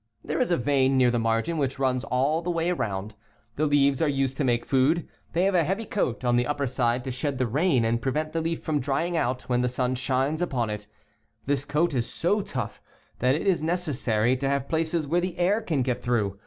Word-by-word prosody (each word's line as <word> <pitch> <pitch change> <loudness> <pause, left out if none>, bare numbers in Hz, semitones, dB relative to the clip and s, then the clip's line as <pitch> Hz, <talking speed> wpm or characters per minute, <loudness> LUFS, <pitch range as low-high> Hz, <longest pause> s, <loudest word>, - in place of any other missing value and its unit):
There 155 +3 -2
is - - +1
a 175 - +2
vein 135 +1 +2
near 125 -2 +4
the 120 - 0
margin 115 +9 0
which 135 -2 -1
runs 130 -1 0
all 140 +6 +1
the 175 - -4
way 170 0 0
around. 105 - -3 0.4
The 155 +3 +1
leaves 140 -1 +3
are 160 - +3
used 135 -1 0
to 150 - 0
make 120 -2 +1
food. 145 +5 +2 0.3
They 175 - +2
have 195 +1 +2
a 175 -2 +4
heavy 195 +8 -2
coat 130 - -2
on 120 0 +3
the 120 - +2
\ipper 145 -1 -1
side 120 0 0
to 130 - -4
shed 135 +2 -2
the 130 - +1
rain 130 0 +2
and 115 +1 0
prevent 155 +5 -1
the 165 - 0
leaf 165 0 -2
from 155 -2 0
drying 145 +6 -1
out 125 -4 0
when 125 -1 0
the 125 - +1
sun 125 0 -1
shines 135 +5 0
upon 125 -10 -1
it 105 -1 -6 0.6
This 140 0 0
coat 165 +2 +1
is 120 -3 -1
so 205 +5 +1
tough - - -5 0.4
that 130 +2 +3
it 160 - -3
is 190 -5 +2
necessary 135 -9 +1
to 135 +1 -1
have 140 -1 -1
places 160 0 0
where 170 +5 +1
the 180 0 -3
air 190 +5 +2
can 150 - 0
get 125 -1 -2
through. 105 -5 -1
135 Hz, 235 wpm, -26 LUFS, 125-165 Hz, 0.6 s, near